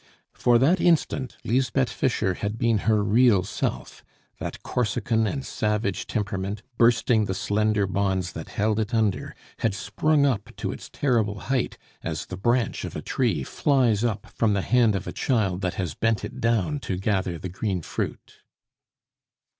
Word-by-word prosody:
For 120 -1 +4
that 160 +9 +3
instant, 150 -6 +1
Lisbeth 130 +2 +1
Fischer 115 -9 0
had 100 +4 -3
been 115 -2 +2
her 105 -1 +3
real 105 -2 +4
self; 95 - -4 0.4
that - - -6
Corsican 115 -1 0
and 135 +4 -3
savage 105 -2 -1
temperament, 100 -1 -3 0.2
bursting 115 -1 +4
the 95 - -2
slender 105 +1 +1
bonds 95 -2 0
that - - -8
held 105 +1 0
it 110 +2 -1
under, 110 -4 0 0.2
had 110 -4 0
sprung 150 +6 +1
up 120 -8 -1
to - - -3
its - - -9
terrible 110 -7 0
height, 130 -3 0 0.2
as 80 -1 -4
the 90 - -6
branch 120 +5 0
of - - -6
a - - -5
tree - - 0
flies 125 -7 +2
up 110 -4 -1
from 110 -3 +2
the 100 - 0
hand 115 -3 +3
of 100 +1 -3
a - - -4
child 100 -8 0
that 90 0 -1
has 90 -6 -2
bent 115 +3 0
it - - -8
down 115 +5 +1
to 95 -8 -3
gather 95 -3 0
the 90 +3 -6
green 95 -1 -2
fruit. - - -5
110 Hz, 165 wpm, -25 LUFS, 100-120 Hz, 0.4 s, For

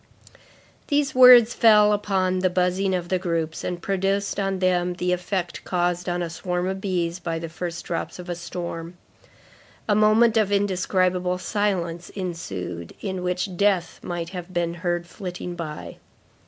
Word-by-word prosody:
These 285 -2 +1
words 250 -2 +8
fell 210 -2 +6
upon 190 -3 0
the 185 0 +2
buzzing 185 +1 +1
of 175 -1 -4
the 185 - +1
groups, 165 -3 -2
and 175 -1 -3
produced 195 +1 0
on 195 -1 0
them 180 -1 +1
the 180 0 -1
effect 180 0 -3
caused 180 0 -1
on 175 0 -1
a 170 - -3
swarm 180 +1 -2
of 190 0 -3
bees 175 -3 -1
by 165 -2 -3
the 165 0 -5
first 175 +1 -5
drops - - -4
of 180 0 -9
a 175 - -2
storm. 170 0 -6 0.9
A 210 - +3
moment 215 +2 +4
of 210 -2 +2
indescribable 185 -2 +1
silence 180 -4 -2
ensued, 95 - -5
in 190 -3 -3
which 180 +1 -2
death 190 -2 +1
might 170 -1 -4
have 180 -1 -7
been 170 -1 -1
heard 175 0 -2
flitting 180 -1 -6
by. 155 -3 -7
180 Hz, 155 wpm, -24 LUFS, 175-195 Hz, 0.9 s, words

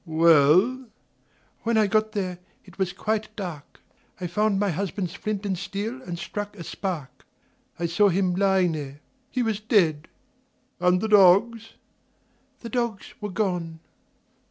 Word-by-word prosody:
"Well 165 - +4 0.3
?" - - -39 0.2
"When 230 0 +1
I 215 - +5
got 215 +1 +1
there 185 -4 -3 0.3
it 190 0 -17
was 190 -2 0
quite 215 +3 -3
dark. 175 -8 -7 0.4
I 180 - -4
found 200 +3 +1
my 205 -2 +1
husband's 185 0 -3
flint 210 -1 -4
and 195 -2 0
steel 200 +7 -5
and 175 -8 -6
struck 205 +3 -6
a 170 - -7
spark. 160 -10 -5 0.5
I 170 - -2
saw 185 +5 +3
him 185 0 +1
lying 190 -1 +2
there. 145 -2 -6 0.3
He 255 - -1
was 220 -3 -1
dead." 180 -9 +2 0.7
"And 180 0 +3
the 220 - -1
dogs?" 210 +3 +4 0.9
"The 235 - -7
dogs 235 -3 -3
were 210 - -3
gone." 180 -5 -2
195 Hz, 150 wpm, -25 LUFS, 175-215 Hz, 0.9 s, I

